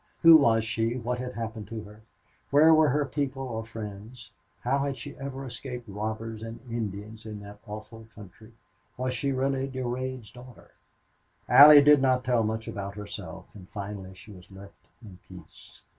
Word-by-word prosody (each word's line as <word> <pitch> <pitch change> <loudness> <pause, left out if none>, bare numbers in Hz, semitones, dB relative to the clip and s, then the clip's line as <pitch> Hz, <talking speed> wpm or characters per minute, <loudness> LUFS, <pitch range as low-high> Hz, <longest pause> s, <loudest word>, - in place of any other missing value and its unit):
Who 165 0 +10
was 115 -6 +3
she, 115 +2 -1
what 125 0 -3
had 125 0 -5
happened 110 -2 -5
to 110 0 -6
her, 105 +1 -14 0.5
where 155 +3 +6
were 155 -1 +5
her 145 +2 +1
people 135 -2 -3
or 115 -4 -4
friends? 110 +1 -9 0.3
How 135 +3 +1
had 140 -1 -2
she 140 +4 -9
ever 135 0 -6
escaped 125 0 -7
robbers 110 +2 -5
and 115 0 -7
Indians 110 -1 -5
in 105 -1 -7
that 100 0 -11
awful 110 +2 -9
country? 110 +2 -14 0.4
Was 130 0 -2
she 140 +3 -1
really 135 0 -1
Durade's 130 -2 -4
daughter? 125 -1 -15 0.8
Allie 145 0 +10
did 145 -1 +6
not 130 -1 +2
tell 125 -2 +2
much 110 0 -2
about 100 0 -6
herself, 105 -1 -8
and 95 -3 -13
finally 100 -2 -7
she 105 - -14
was 90 -3 -14
left 100 0 -15 0.2
in 95 -4 -13
peace. 90 -4 -15
115 Hz, 170 wpm, -27 LUFS, 105-130 Hz, 0.8 s, Who